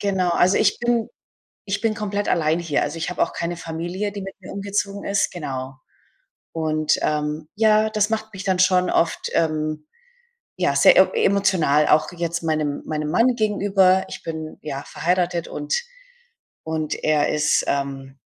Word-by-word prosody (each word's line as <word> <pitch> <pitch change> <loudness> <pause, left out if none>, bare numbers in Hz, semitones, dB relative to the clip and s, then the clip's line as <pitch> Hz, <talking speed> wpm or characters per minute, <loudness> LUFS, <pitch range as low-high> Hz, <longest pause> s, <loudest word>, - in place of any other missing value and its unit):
Genau, 190 -3 0
also 180 +2 +3
ich 205 - +2
bin 240 -1 0 0.6
ich 195 0 -2
bin 220 -1 +1
komplett 205 -1 -3
allein 160 -1 +2
hier. 165 -4 0
Also, 145 +2 -3
ich 165 - -3
habe 180 - -1
auch - - 0
keine 170 0 -3
Familie, 175 +5 -4
die 200 - -6
mit 195 0 -7
mir 185 - -10
umgezogen 200 0 -3
ist, 200 0 +1
genau. 135 -5 -5 0.8
Und, 155 -2 0
ähm, 150 +1 -2
ja, 215 0 +3
das 215 0 +1
macht 220 0 -2
mich 195 - -7
dann 190 -2 0
schon 185 -1 +3
oft, 165 - 0
ähm, 155 -1 -1 0.7
ja - - +1
sehr - - +6
emo - - +6
emotional 190 - +2
auch 155 +3 +3
jetzt 170 0 -3
meinem 155 -3 -1
meinem 150 -1 -3
Mann 240 +5 +3
gegenüber. 195 -3 +3
Ich - - -8
bin, 160 -1 -6
ja, 140 -2 -5
verheiratet 175 -1 -1
und 295 - -4 0.9
und 160 -1 -2
er 150 -1 +2
ist, 150 0 +2
ähm 135 -1 -3
175 Hz, 165 wpm, -22 LUFS, 155-200 Hz, 0.9 s, sehr